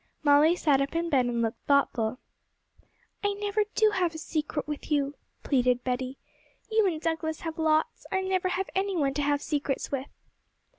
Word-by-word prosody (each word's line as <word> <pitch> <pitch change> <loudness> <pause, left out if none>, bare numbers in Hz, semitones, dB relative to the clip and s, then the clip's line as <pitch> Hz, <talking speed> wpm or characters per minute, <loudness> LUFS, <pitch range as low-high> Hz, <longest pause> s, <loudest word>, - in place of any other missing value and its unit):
Molly 295 +3 +5
sat 290 -6 +3
up 275 +3 -2
in 335 0 -1
bed 255 -4 +3
and 235 -1 0
looked 225 0 -3
thoughtful. 255 -5 +2 1.1
'I 410 0 +1
never 415 +1 0
do 435 -1 +4
have 355 -5 0
a - - -4
secret 305 -2 -3
with 300 +1 -6
you,' 285 -1 +1 0.3
pleaded 250 -2 +2
Betty. 255 +1 -2 0.5
'You 440 -2 +4
and 325 -4 -1
Douglas 320 -1 -2
have 325 -1 -5
lots; 315 0 +1
I 380 - +1
never 375 -1 0
have 370 +1 -2
any 385 0 0
one 275 -4 +1
to 290 - -1
have 290 0 +1
secrets 285 -2 -2
with.' 275 0 -3
305 Hz, 180 wpm, -28 LUFS, 275-355 Hz, 1.1 s, Molly